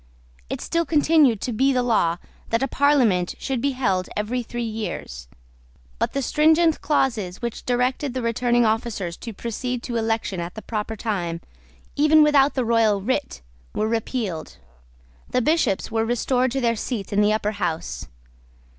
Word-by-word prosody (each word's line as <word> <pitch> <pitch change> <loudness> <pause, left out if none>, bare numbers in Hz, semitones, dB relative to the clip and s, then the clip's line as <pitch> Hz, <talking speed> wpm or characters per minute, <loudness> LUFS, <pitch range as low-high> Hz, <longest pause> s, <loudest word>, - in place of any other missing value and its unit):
It - - -4
still 335 0 0
continued 300 -7 +3
to 245 - -2
be 265 +5 +3
the 250 -2 +1
law 190 -8 +2 0.3
that 230 +3 +1
a - - +1
Parliament 250 -11 +2
should 265 -4 -3
be 280 +1 0
held 195 -8 0
every 225 +4 -1
three 240 0 -5
years: 215 - -5 0.7
but - - 0
the 275 - -1
stringent 320 +3 +3
clauses 225 -11 0
which 235 -2 -5
directed 250 +2 0
the 255 - -2
returning 240 +1 +2
officers 220 -6 -1
to 230 - -7
proceed 235 +3 -4
to 240 -2 -3
election 225 -4 -1
at 170 +1 -5
the 220 - -8
proper 220 0 -3
time, 180 -7 -3 0.6
even 305 +1 +5
without 290 -2 +4
the 255 -3 0
royal 225 -3 +3
writ, 260 - -2 0.3
were 215 - 0
repealed. 220 -6 -3 0.7
The 250 - +1
Bishops 250 - +1
were 225 0 +1
restored 250 +2 +1
to 270 - -1
their 230 -1 +2
seats 220 -2 -4
in 205 - +3
the 210 0 +4
Upper 215 -1 0
House. 165 - -3
235 Hz, 165 wpm, -23 LUFS, 210-260 Hz, 0.7 s, even